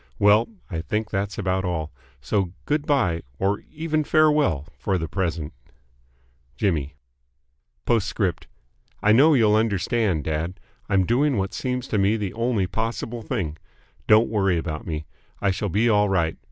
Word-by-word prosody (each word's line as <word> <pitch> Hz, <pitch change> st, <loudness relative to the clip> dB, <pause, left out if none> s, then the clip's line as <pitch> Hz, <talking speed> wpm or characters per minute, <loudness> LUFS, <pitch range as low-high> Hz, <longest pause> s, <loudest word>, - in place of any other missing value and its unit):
Well. 105 Hz, +2 st, +4 dB, 0.2 s
I 80 Hz, -3 st, -4 dB
think 110 Hz, +3 st, -3 dB
that's 100 Hz, +1 st, -2 dB
about 95 Hz, -1 st, 0 dB
all. 80 Hz, -4 st, -2 dB, 0.3 s
So 90 Hz, +5 st, -1 dB
good 150 Hz, 0 st, -1 dB
bye 100 Hz, -, +2 dB, 0.2 s
or 100 Hz, +4 st, 0 dB
even 155 Hz, 0 st, -1 dB
farewell 150 Hz, -, +3 dB
for 95 Hz, -2 st, -1 dB
the 80 Hz, -1 st, -3 dB
present. 85 Hz, -3 st, -2 dB, 1.0 s
J. 75 Hz, -8 st, 0 dB, 1.0 s
P.S. 110 Hz, -3 st, +1 dB, 0.9 s
I 105 Hz, -, +5 dB
know 145 Hz, +7 st, +6 dB
you'll 110 Hz, -4 st, +4 dB
understand, 105 Hz, -, +1 dB
dad. 80 Hz, +4 st, -3 dB, 0.3 s
I'm 95 Hz, -2 st, +3 dB
doing 135 Hz, +5 st, +2 dB
what 95 Hz, 0 st, -2 dB
seems 125 Hz, 0 st, -3 dB
to 105 Hz, -, +1 dB
me 100 Hz, +3 st, +3 dB
the 100 Hz, -4 st, -3 dB
only 115 Hz, -3 st, 0 dB
possible 115 Hz, +4 st, -3 dB
thing. 80 Hz, -7 st, -3 dB, 0.5 s
Don't 110 Hz, +2 st, +6 dB
worry 95 Hz, -5 st, +1 dB
about 80 Hz, -1 st, -4 dB
me. 80 Hz, -2 st, -4 dB, 0.3 s
I 100 Hz, -, +2 dB
shall 100 Hz, +2 st, -2 dB
be 105 Hz, +6 st, +2 dB
all 105 Hz, -2 st, +3 dB
right. 85 Hz, -4 st, +1 dB
100 Hz, 150 wpm, -24 LUFS, 90-115 Hz, 1.0 s, know